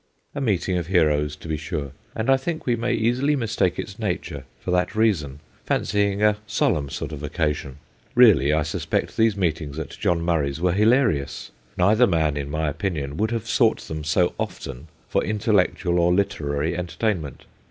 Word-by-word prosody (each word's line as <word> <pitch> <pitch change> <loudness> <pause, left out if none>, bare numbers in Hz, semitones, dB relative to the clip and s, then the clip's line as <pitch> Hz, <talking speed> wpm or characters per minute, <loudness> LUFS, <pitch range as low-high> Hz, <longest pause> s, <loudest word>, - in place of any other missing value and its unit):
A 140 - -4
meeting 95 -6 0
of 85 - -5
heroes, 75 -5 +2
to 75 - -12
be 80 -1 -1
sure, 75 -2 -4 0.2
and 110 - -2
I - - +7
think 160 +5 -4
we 120 - +2
may 120 +1 -1
easily 125 +6 +1
mistake 110 -8 0
its 105 +1 -6
nature 85 -9 -3
for 90 - -4
that 90 +3 +1
reason, 80 -11 +1 0.2
fancying 100 0 0
a 105 -1 +4
solemn 95 - 0
sort - - -5
of 75 -2 -7
occasion. 75 -2 -2 0.4
Really, 110 - +6
I 75 0 +2
suspect - - -2
these 110 -3 +2
meetings 80 -5 -1
at 80 -3 -5
John 85 -1 0
Murray's 80 -4 0
were 90 0 +1
hilarious: 105 - +1 0.3
neither 110 +7 +4
man, 80 -4 +1
in 70 -1 -4
my 80 +1 -1
opinion, 75 -3 -3
would 110 +3 +1
have 115 -1 -3
sought 115 -3 +2
them 80 -1 -6
so 85 +3 +2
often 70 +3 -5 0.2
for - - 0
intellectual 100 -4 +1
or 85 +1 +3
literary 80 -4 0
entertainment. 90 - -3
90 Hz, 175 wpm, -23 LUFS, 75-110 Hz, 0.4 s, I